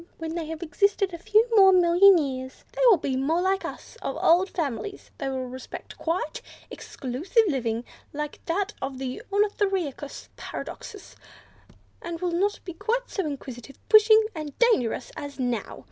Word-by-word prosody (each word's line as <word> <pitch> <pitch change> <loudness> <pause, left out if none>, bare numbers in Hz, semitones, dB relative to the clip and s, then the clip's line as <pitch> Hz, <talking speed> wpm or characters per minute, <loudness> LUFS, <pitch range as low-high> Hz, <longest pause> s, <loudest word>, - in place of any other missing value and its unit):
When 325 0 -5
they 330 -2 -4
have 320 +1 -5
existed 395 +4 +1
a 340 - -6
few 430 +5 +3
more 385 -2 +8
million 365 +1 +6
years, 260 -4 -4
they - - -5
will 435 -6 +7
be 275 -3 -2
more 290 +6 +1
like 380 +1 +1
us - - -8
of - - -3
old 360 +4 +4
families; 330 - -4
they 270 - -2
will 260 -1 -3
respect 255 +1 -9
quiet, 330 -1 -2 0.3
exclusive 290 - -1
living, 240 -6 -1 0.3
like 300 0 -5
that 390 +4 -1
of 270 0 -4
the 260 -1 -5
Ornithorhynchus 390 - -1
Paradoxus, 410 -3 -8 0.9
and 340 -1 -5
will 360 0 -1
not 395 +4 0
be 355 -3 -7 0.3
so 390 - -3
inquisitive, 270 -2 -8
pushing, 435 0 +7
and 305 -4 -7
dangerous 440 - +2
as 285 -2 -7
now. 245 -4 -2
330 Hz, 155 wpm, -26 LUFS, 270-390 Hz, 0.9 s, more